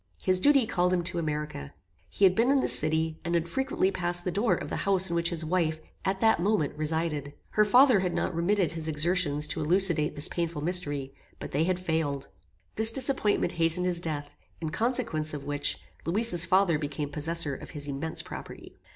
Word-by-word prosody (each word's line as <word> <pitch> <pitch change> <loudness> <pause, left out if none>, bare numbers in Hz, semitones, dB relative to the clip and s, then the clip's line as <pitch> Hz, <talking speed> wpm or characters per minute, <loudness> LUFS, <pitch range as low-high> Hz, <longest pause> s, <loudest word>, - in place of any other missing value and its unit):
His 185 -1 +3
duty 275 +2 +4
called 180 -4 0
him 175 -1 0
to 175 0 -2
America. 150 - -4 0.3
He 200 - +2
had 185 - +5
been 230 +6 +2
in 275 0 +4
this - - +2
city, 160 +1 -1
and 170 +1 -1
had 170 0 0
frequently 265 -1 0
passed 175 -1 -3
the 180 - 0
door 210 +6 +1
of - - -7
the - - -2
house 190 -2 +2
in - - -1
which 170 0 +1
his 170 -2 -3
wife, 160 -2 0 0.2
at 190 0 -2
that 220 -4 +4
moment, 195 -7 0
resided. 155 -2 -2 0.2
Her 215 - +3
father 245 +1 +5
had 180 -2 -2
not 175 - -1
remitted 175 +1 +1
his 160 -1 -5
exertions 155 -1 +1
to 160 - -2
elucidate 170 -1 +3
this 145 +3 +1
painful 170 -3 -3
mystery, 145 -6 +1 0.3
but - - -7
they 150 +4 +1
had 185 0 0
failed. 160 -6 -2 0.5
This 220 +1 +6
disappointment 250 -3 +1
hastened 165 +1 +1
his 175 -1 0
death; 150 -4 -4 0.3
in 160 -2 -4
consequence 155 -9 0
of 140 - -7
which, 145 0 -2 0.3
Louisa's 180 0 +2
father 185 -5 +3
became 145 -1 -4
possessor 155 0 -2
of - - -9
his 145 -1 -7
immense 145 +3 -4
property." - - -10
170 Hz, 195 wpm, -28 LUFS, 155-190 Hz, 0.5 s, This